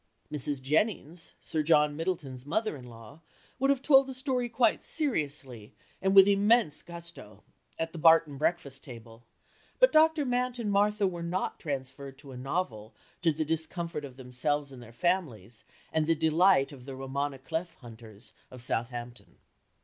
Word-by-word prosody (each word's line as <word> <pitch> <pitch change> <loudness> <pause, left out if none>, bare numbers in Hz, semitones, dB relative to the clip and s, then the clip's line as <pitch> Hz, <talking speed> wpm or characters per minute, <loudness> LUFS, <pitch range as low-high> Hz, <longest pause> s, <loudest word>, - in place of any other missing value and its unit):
Mrs. 145 -2 -2
Jennings, 165 +2 -1
Sir 155 - -2
John 150 -1 +3
Middleton's 155 -7 -4
mother 215 +7 -1
in 130 -3 -11
law, 115 +6 -13 0.4
would 270 +1 +2
have 275 -1 +2
told 270 -2 +6
the 265 - -7
story 255 -2 -1
quite 235 +1 +2
seriously, 145 - -2 0.3
and 190 +1 +1
with 195 0 +9
immense 205 -4 +3
gusto, 170 -10 -11 0.3
at 165 0 -3
the 165 - -8
Barton 160 -3 +5
breakfast 140 -4 -2
table, 115 -2 -12 0.5
but - - +6
Dr. 315 -1 +4
Mant 250 0 -1
and 220 -4 -2
Martha 205 +1 +2
were 175 -3 -2
not 170 +2 -3
transferred 135 -2 -6
to 140 -1 -13
a - - -9
novel 125 -6 -4 0.3
to 165 - +3
the 155 +1 -2
discomfort 160 0 -3
of 130 -3 -9
themselves 135 +3 -2
and 130 -2 -11
their 120 -1 -12
families 120 - -2 0.3
and 155 -1 +1
the 165 - +3
delight 160 -1 +3
of 130 -3 -12
the 135 -1 -7
roman 135 +2 -3
à - - -10
clef 165 +4 -4
hunters 115 -3 -12 0.2
of 125 -2 -6
Southampton. 120 0 -4
155 Hz, 165 wpm, -29 LUFS, 130-190 Hz, 0.5 s, with